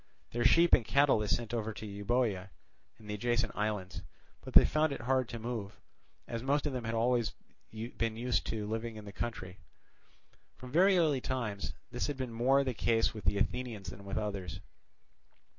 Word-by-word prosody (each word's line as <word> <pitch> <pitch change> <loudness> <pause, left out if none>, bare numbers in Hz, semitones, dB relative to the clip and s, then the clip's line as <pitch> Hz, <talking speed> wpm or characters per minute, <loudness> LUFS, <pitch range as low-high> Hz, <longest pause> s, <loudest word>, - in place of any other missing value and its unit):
Their 120 0 -1
sheep 170 +1 +5
and - - +7
cattle 140 +1 +4
they 105 - -1
sent 120 +3 -1
over 110 -2 -2
to 110 - -7
Euboea 100 -1 -1 0.5
and 110 - -15
the 105 - -3
adjacent 120 +3 0
islands. 105 -3 -2 0.4
But - - -9
they - - +10
found 155 0 +2
it - - -4
hard 130 0 +1
to 120 - -5
move, 115 -3 -5 0.5
as 115 -1 -4
most 140 +3 +1
of 145 - -1
them 125 -3 -3
had 115 - -2
been 115 - +1
always 120 -1 +2 0.4
used 115 +1 -2
to 110 -2 -2
live 110 +2 -2
in 110 -3 -7
the 100 - -8
country. 95 -5 -5 1.0
From 125 -1 -10
very 185 +5 +5
early 150 -6 +3
times 115 -7 -3 0.2
this 120 -1 -1
had 145 -2 -3
been 130 -3 -4
more 130 +4 +3
the 130 -2 -1
case 115 0 +2
with 105 -5 -8
the 100 +4 +2
Athenians 120 -2 -2
than 100 - -11
with 100 - -4
others. 100 -5 -3
115 Hz, 190 wpm, -32 LUFS, 105-125 Hz, 1.0 s, they